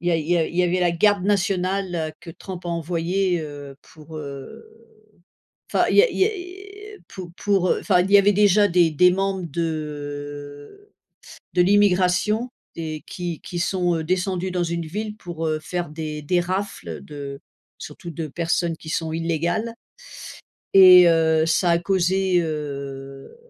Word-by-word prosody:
il 175 Hz, -, -2 dB
y -, -, +3 dB
a -, -, +3 dB
il 155 Hz, -2 st, -4 dB
y 175 Hz, -, +3 dB
a 165 Hz, -2 st, +1 dB
il -, -, -9 dB
y 180 Hz, -, +4 dB
avait 180 Hz, +1 st, 0 dB
la 175 Hz, -1 st, +3 dB
garde 195 Hz, +3 st, +2 dB
nationale 185 Hz, -4 st, 0 dB
que 170 Hz, -, -10 dB
Trump 180 Hz, +1 st, -9 dB
a -, -, -3 dB
envoyé, 170 Hz, +2 st, -1 dB
heu, 145 Hz, -3 st, -8 dB
pour, 155 Hz, 0 st, -13 dB
heu, 140 Hz, -, -8 dB, 1.1 s
enfin -, -, +3 dB
il -, -, +1 dB
y 410 Hz, -, +9 dB
a -, -, +1 dB
il -, -, -6 dB
y -, -, +5 dB, 0.7 s
a -, -, -15 dB
pour 180 Hz, -2 st, -9 dB
pour, 195 Hz, -3 st, +1 dB
heu, -, -, +2 dB
enfin, 185 Hz, -4 st, +3 dB
il 195 Hz, +2 st, -3 dB
y 200 Hz, -, +9 dB
avait 200 Hz, +1 st, +4 dB
déjà 205 Hz, 0 st, +4 dB
des 175 Hz, -2 st, +3 dB
des 180 Hz, +5 st, +5 dB
membres 195 Hz, 0 st, -1 dB
de 145 Hz, -, -6 dB, 0.7 s
de 180 Hz, -, +3 dB
l'immigration 205 Hz, +4 st, +2 dB, 0.3 s
et 155 Hz, -2 st, -5 dB
qui 175 Hz, -3 st, -5 dB
qui 175 Hz, -, -6 dB
sont 175 Hz, -1 st, 0 dB
descendus, 185 Hz, +2 st, -1 dB
heu, -, -, -5 dB
dans 180 Hz, -1 st, 0 dB
une 170 Hz, -1 st, -3 dB
ville, 210 Hz, +5 st, -5 dB
pour, 170 Hz, -5 st, -6 dB
heu, 155 Hz, -1 st, 0 dB
faire 175 Hz, +2 st, -4 dB
des 155 Hz, -1 st, -5 dB
des 175 Hz, +5 st, +1 dB
rafles 190 Hz, +3 st, -4 dB
de 140 Hz, -2 st, -8 dB, 0.4 s
surtout 170 Hz, -, -9 dB
de 160 Hz, +1 st, -4 dB
personnes 170 Hz, +2 st, -1 dB
qui 160 Hz, -, -13 dB
sont 160 Hz, -1 st, -2 dB
illégales. 170 Hz, +7 st, -1 dB, 1.0 s
Et 185 Hz, -2 st, +9 dB
heu, 160 Hz, -1 st, +3 dB
ça 175 Hz, +2 st, +2 dB
a 170 Hz, -, +4 dB
causé, 185 Hz, 0 st, +1 dB
heu, 140 Hz, -, -6 dB
175 Hz, 175 wpm, -22 LUFS, 155-190 Hz, 1.1 s, y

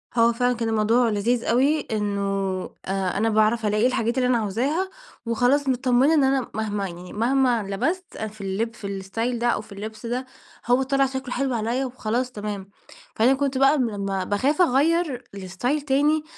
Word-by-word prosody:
هو 230 Hz, 0 st, +4 dB
فعلًا 245 Hz, +1 st, +1 dB
كان 230 Hz, -1 st, -2 dB
الموضوع 225 Hz, +2 st, +3 dB
لذيذ 230 Hz, +3 st, 0 dB
أوي، 275 Hz, +6 st, +2 dB
إنه 205 Hz, -2 st, -1 dB, 0.6 s
آآ 190 Hz, -1 st, -1 dB
أنا 225 Hz, +3 st, +2 dB
باعرف 220 Hz, +1 st, +2 dB
ألاقي 210 Hz, +4 st, +3 dB
الحاجات 240 Hz, -1 st, -1 dB
اللي 250 Hz, -1 st, +2 dB
أنا 250 Hz, -2 st, +3 dB
عاوزاها، 260 Hz, -, -1 dB, 0.4 s
وخلاص 245 Hz, +5 st, +2 dB
متطمنة 260 Hz, +3 st, +3 dB
إن 300 Hz, -3 st, +4 dB
أنا 265 Hz, -2 st, +1 dB
مهما 205 Hz, -2 st, -2 dB
يعني 175 Hz, +1 st, -10 dB
مهما 245 Hz, +1 st, +2 dB
لبست 290 Hz, -, -3 dB
في 215 Hz, -1 st, -6 dB
اللب 200 Hz, +4 st, -2 dB
في 200 Hz, -, -7 dB
الإستايل 225 Hz, +5 st, -3 dB
ده 240 Hz, -, +1 dB
أو 235 Hz, -, +1 dB
في 215 Hz, -, -17 dB
اللبس 215 Hz, +3 st, -8 dB
ده، 250 Hz, +2 st, -2 dB, 0.4 s
هو 245 Hz, +2 st, +3 dB
طلع 275 Hz, 0 st, +2 dB
شكله 265 Hz, -1 st, -5 dB
حلو 265 Hz, 0 st, -1 dB
عليَّ 235 Hz, +4 st, -1 dB
وخلاص 250 Hz, 0 st, -2 dB
تمام. 205 Hz, -3 st, -6 dB, 0.5 s
فأنا 240 Hz, +5 st, +4 dB
كنت 275 Hz, -1 st, -1 dB
بقى 275 Hz, +3 st, +5 dB
لمّا 200 Hz, -6 st, -1 dB
باخاف 260 Hz, -, +1 dB
أغيّر 300 Hz, -2 st, +2 dB
لإستايل 200 Hz, +10 st, -2 dB
تاني، 295 Hz, +2 st, +2 dB
235 Hz, 170 wpm, -24 LUFS, 210-265 Hz, 0.6 s, بقى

